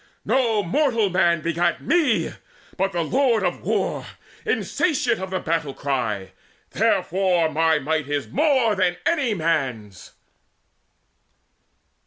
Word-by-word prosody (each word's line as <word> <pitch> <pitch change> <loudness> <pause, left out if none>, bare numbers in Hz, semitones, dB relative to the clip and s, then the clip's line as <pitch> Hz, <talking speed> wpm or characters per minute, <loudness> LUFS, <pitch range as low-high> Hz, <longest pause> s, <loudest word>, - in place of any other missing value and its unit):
No 230 -5 +2
mortal 230 - +1
man 170 -3 +2
begat 170 +1 0
me, 275 - +1 0.4
but 195 +1 0
the 170 -2 -1
Lord 240 - +2
Of 180 -1 -1
War, - - -1 0.4
insatiate 260 -9 0
of 190 0 -5
the 185 0 -2
battle 155 -4 -2
cry. 115 -9 -2 0.4
Therefore 180 -3 +1
my 160 +1 +2
might 150 0 -2
is 145 -1 -2
more 270 -7 +2
than 185 -3 +1
any 280 -10 +1
man's." 130 - -2
175 Hz, 115 wpm, -23 LUFS, 155-230 Hz, 0.4 s, No